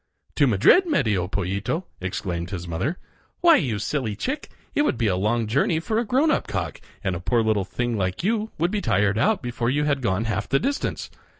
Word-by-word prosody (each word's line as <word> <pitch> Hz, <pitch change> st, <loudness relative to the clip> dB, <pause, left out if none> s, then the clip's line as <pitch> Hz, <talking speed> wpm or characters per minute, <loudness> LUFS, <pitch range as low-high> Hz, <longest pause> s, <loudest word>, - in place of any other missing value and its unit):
"To 145 Hz, -, +5 dB
Madrid, 125 Hz, -, +5 dB
Medio 110 Hz, -, +1 dB
Pollito!" 100 Hz, -, -2 dB, 0.2 s
exclaimed 90 Hz, -2 st, -3 dB
his 90 Hz, -3 st, -5 dB
mother. 95 Hz, -, -2 dB, 0.4 s
"Why, 340 Hz, -3 st, +7 dB
you 120 Hz, -, -1 dB
silly 110 Hz, 0 st, -2 dB
chick, 275 Hz, -, -3 dB, 0.2 s
it -, -, +2 dB
would 295 Hz, -, +1 dB
be 115 Hz, -, 0 dB
a 95 Hz, -4 st, +2 dB
long 110 Hz, +5 st, +1 dB
Journey 140 Hz, -, +1 dB
for 220 Hz, +7 st, -1 dB
a 235 Hz, -, -1 dB
grown 270 Hz, +8 st, +3 dB
up -, -, 0 dB
cock, -, -, -4 dB, 0.2 s
and 95 Hz, -2 st, 0 dB
a -, -, -4 dB
poor 115 Hz, +5 st, +1 dB
little 110 Hz, -3 st, +1 dB
thing 120 Hz, +2 st, -2 dB
like 95 Hz, -, -2 dB
you 220 Hz, +2 st, 0 dB
would 170 Hz, +3 st, +1 dB
be 210 Hz, -1 st, -1 dB
tired 100 Hz, -, +2 dB
out 210 Hz, -, +2 dB
before 120 Hz, -1 st, -1 dB
you 145 Hz, +3 st, +1 dB
had 145 Hz, -2 st, +1 dB
gone 105 Hz, -1 st, 0 dB
half 105 Hz, -2 st, -2 dB
the 135 Hz, -, +3 dB
distance. 280 Hz, -, -2 dB
115 Hz, 210 wpm, -24 LUFS, -, 0.4 s, Why